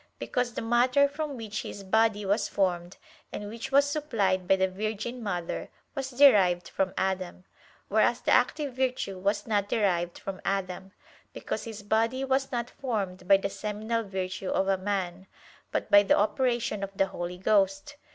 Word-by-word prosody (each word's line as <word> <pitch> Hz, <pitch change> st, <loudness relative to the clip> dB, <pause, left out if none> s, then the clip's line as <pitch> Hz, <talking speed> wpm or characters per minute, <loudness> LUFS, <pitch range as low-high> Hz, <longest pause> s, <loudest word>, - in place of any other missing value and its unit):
Because 245 Hz, -2 st, -2 dB
the -, -, -3 dB
matter 250 Hz, +4 st, +4 dB
from 290 Hz, -1 st, -5 dB
which 215 Hz, -2 st, -4 dB
His 200 Hz, -, -8 dB
Body 215 Hz, +1 st, +2 dB
was 200 Hz, +3 st, +1 dB
formed, 180 Hz, -2 st, -1 dB, 0.3 s
and 205 Hz, -, -5 dB
which 230 Hz, +5 st, -7 dB
was 280 Hz, +1 st, +5 dB
supplied 215 Hz, -12 st, 0 dB
by 195 Hz, -, +5 dB
the 190 Hz, 0 st, +2 dB
Virgin 215 Hz, +5 st, -4 dB
Mother, 180 Hz, -6 st, -3 dB, 0.2 s
was 270 Hz, -2 st, -4 dB
derived 205 Hz, -10 st, +5 dB
from 190 Hz, -1 st, -2 dB
Adam; 185 Hz, -1 st, -2 dB, 0.4 s
whereas 220 Hz, +3 st, +2 dB
the -, -, -1 dB
active 275 Hz, +2 st, +2 dB
virtue 250 Hz, -7 st, -2 dB
was 200 Hz, +2 st, 0 dB
not 205 Hz, -2 st, 0 dB
derived 175 Hz, -5 st, 0 dB
from 195 Hz, -1 st, -7 dB
Adam, 190 Hz, -1 st, -3 dB, 0.4 s
because -, -, -4 dB
His 220 Hz, -2 st, -8 dB
Body 230 Hz, +5 st, +1 dB
was 270 Hz, 0 st, 0 dB
not 240 Hz, -1 st, -2 dB
formed 200 Hz, -9 st, -4 dB
by 195 Hz, 0 st, +7 dB
the 195 Hz, 0 st, -3 dB
seminal 215 Hz, +3 st, -2 dB
virtue 190 Hz, -1 st, -4 dB
of 195 Hz, -, +1 dB
a 195 Hz, -, +3 dB
man, 190 Hz, -1 st, -3 dB, 0.4 s
but -, -, -2 dB
by 205 Hz, -, +9 dB
the 200 Hz, -, +3 dB
operation 235 Hz, 0 st, 0 dB
of 195 Hz, -, -3 dB
the 195 Hz, -, +4 dB
Holy 175 Hz, -1 st, -5 dB
Ghost. 195 Hz, +6 st, +1 dB
205 Hz, 170 wpm, -28 LUFS, 190-240 Hz, 0.4 s, by